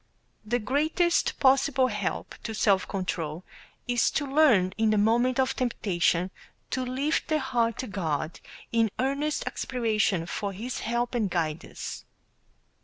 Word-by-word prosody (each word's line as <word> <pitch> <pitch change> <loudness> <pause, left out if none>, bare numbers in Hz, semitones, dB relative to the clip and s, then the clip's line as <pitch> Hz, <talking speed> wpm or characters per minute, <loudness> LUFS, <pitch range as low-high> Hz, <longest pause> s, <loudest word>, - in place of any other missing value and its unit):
The 230 +3 0
greatest 310 - +1
possible 270 0 +4
help 210 -6 -3
to 220 - -5
self 200 -3 +3
control 170 -3 -3 0.4
is 245 -2 +3
to 290 - -1
learn 265 -11 +4
in 225 -1 +2
the 215 - +3
moment 235 +5 +3
of 260 - +2
temptation 185 -7 0 0.4
to 260 - 0
lift 265 +5 -1
the 310 - +2
heart 240 -4 0
to 255 - -4
God 165 -5 -2 0.3
in 230 -1 +3
earnest 280 +4 -1
aspiration 220 -8 0
for 200 +3 -3
His 235 +7 -5
help 235 +2 -1
and 225 -5 0
guidance. 165 -3 -3
230 Hz, 135 wpm, -27 LUFS, 195-260 Hz, 0.4 s, possible